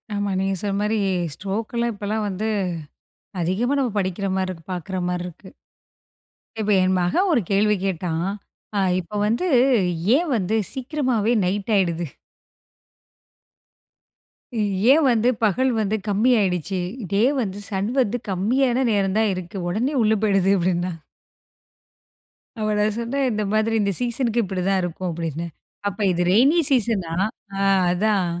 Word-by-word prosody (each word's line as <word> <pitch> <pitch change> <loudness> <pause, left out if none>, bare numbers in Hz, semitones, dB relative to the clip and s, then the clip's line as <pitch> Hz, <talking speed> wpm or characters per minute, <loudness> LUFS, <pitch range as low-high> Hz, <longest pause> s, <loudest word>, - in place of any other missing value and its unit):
ஆமா, 205 0 -1
நீங்க 195 0 0
சொன்ன 200 -1 -1
மாரி 215 +1 0 0.4
ஸ்ட்ரோக்லாம் 225 +6 -2
இப்போலாம் 210 +1 -2
வந்து 200 +2 -3 0.9
அதிகமா 195 +10 0
நம்ம 255 -4 0
படிக்கிற 190 +1 -2
மார 190 0 0
இருக்கு. 165 -3 -11
பாக்குற 185 +2 -4
மார 180 0 -2
இருக்கு. 180 +2 -12 1.1
இப்ப 215 -1 0
என் 185 0 +2
மகன் 265 - +1
ஒரு 265 -7 +3
கேள்வி 210 +2 +3
கேட்டான்! 175 -1 -1 0.5
ஆ - - +3 0.2
இப்ப 195 +4 -5
வந்து, 235 +12 0 0.7
ஏன் 325 +1 0
வந்து 210 0 0 0.2
சீக்கிரமாவே 255 -5 0
நைட் 195 +4 -2
ஆயிடுது? 170 -4 0 2.8
ஏன் 310 +3 +5
வந்து, 235 0 +3
பகல் 255 +5 +2
வந்து 215 0 0
கம்மி 210 +5 +3
ஆயிடுச்சு? 185 -1 -1 0.3
டே 200 +1 +2 0.2
வந்து, 200 -3 -4
சன் 200 +2 -1
வந்து 245 0 -1
கம்மியான 245 +7 +1
நேரம் 195 -2 +1
தான் 220 -2 +2
இருக்கு, 185 +1 -6
உடனே 235 +11 -1
உள்ள 215 -1 +3
போயிடுது! 195 -2 +3
அப்டினான். 175 -1 -1 1.6
அப்ப 215 -1 -1
நான் 210 0 +1
சொன்னேன், 270 +4 -1
இந்த 215 -1 -1
மாரி 220 +1 +1
இந்த 200 -1 +1
சீசனுக்கு 240 -1 0
இப்படி 190 -2 -3
தான் 195 -1 +2
இருக்கும் 175 +1 -3
அப்டின்னு. 165 0 -4 0.4
அப்ப 200 +1 -4
இது 175 0 -1
ரெயினி 270 - +5
சீசனா! 220 -9 +1 0.5
ஆ - - -2 0.3
அதான். 200 +1 +1
205 Hz, 135 wpm, -22 LUFS, 185-230 Hz, 2.8 s, ஏன்